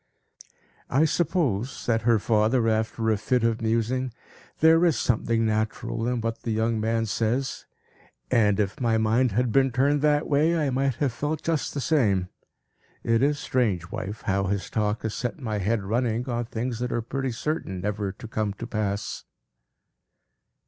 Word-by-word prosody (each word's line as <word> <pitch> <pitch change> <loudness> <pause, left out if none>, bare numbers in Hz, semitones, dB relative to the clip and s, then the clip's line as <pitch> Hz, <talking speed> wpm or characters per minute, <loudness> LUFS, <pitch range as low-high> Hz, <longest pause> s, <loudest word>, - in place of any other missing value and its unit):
"I 140 +5 +3
suppose," 145 - 0
said 115 -5 -1
her 115 0 +4
father, 110 +3 +2
after 110 0 0
a 110 - +2
fit 120 +3 0
of 115 -1 +1
musing, 115 +3 0 0.5
"there 160 +1 +5
is 170 -5 +3
something 115 -1 +1
natural 110 +1 -1
in 125 -1 -1
what 115 0 -3
the - - -5
young 110 +1 0
man 115 +1 0
says; 115 +5 -1 0.6
and 105 -5 +3
if 100 -1 -1
my 115 -2 +2
mind 110 +2 +2
had 120 +2 +1
been 135 +3 +4
turned 140 +3 +2
that 150 0 +2
way, 155 +4 +3
I 150 -4 0
might 135 0 +1
have 135 -3 -1
felt 150 +4 -3
just 160 -3 -1
the 140 - -1
same. 100 - +2 0.7
It 115 0 +2
is 145 +2 +2
strange, 100 - -1
wife, 110 -1 -5
how 100 0 0
his 100 0 -2
talk 105 0 -1
has 110 -1 -2
set 125 +4 -3
my 110 -6 -2
head 105 +2 0
running 115 +3 -1
on 120 -1 -1
things 115 +1 -3
that 125 0 -2
are 120 - -1
pretty 135 +2 -3
certain 115 - -3
never 105 0 -2
to 110 +4 -10
come 110 -2 -2
to 115 - -7
pass." 105 -3 -3
115 Hz, 170 wpm, -26 LUFS, 110-130 Hz, 0.7 s, there